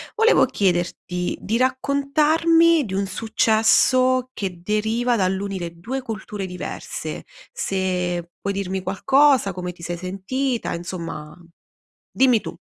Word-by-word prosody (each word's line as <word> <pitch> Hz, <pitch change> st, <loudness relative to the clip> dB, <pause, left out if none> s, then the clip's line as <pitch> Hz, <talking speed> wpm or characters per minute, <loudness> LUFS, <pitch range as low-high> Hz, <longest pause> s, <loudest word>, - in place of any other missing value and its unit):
volevo 450 Hz, +1 st, +5 dB
chiederti 180 Hz, -1 st, -1 dB
di 225 Hz, +3 st, -1 dB
raccontarmi 300 Hz, +5 st, +3 dB
di 190 Hz, -, -6 dB
un 195 Hz, 0 st, -1 dB
successo 230 Hz, +4 st, +3 dB
che 180 Hz, -4 st, -5 dB
deriva 220 Hz, +5 st, 0 dB
dall'unire 190 Hz, -3 st, -1 dB
2 260 Hz, +9 st, -4 dB
culture 210 Hz, -3 st, -5 dB
diverse. 180 Hz, 0 st, -6 dB, 0.3 s
Se 180 Hz, -, -2 dB
puoi 200 Hz, -, -2 dB
dirmi 190 Hz, -1 st, -3 dB
qualcosa, 260 Hz, +5 st, +3 dB
come 180 Hz, -1 st, -5 dB
ti 175 Hz, -, -17 dB
sei 175 Hz, +1 st, -4 dB
sentita, 205 Hz, +8 st, -2 dB
insomma, 170 Hz, -3 st, -6 dB, 0.8 s
dimmi 250 Hz, -4 st, +4 dB
tu. -, -, -7 dB
200 Hz, 115 wpm, -22 LUFS, 180-255 Hz, 0.8 s, volevo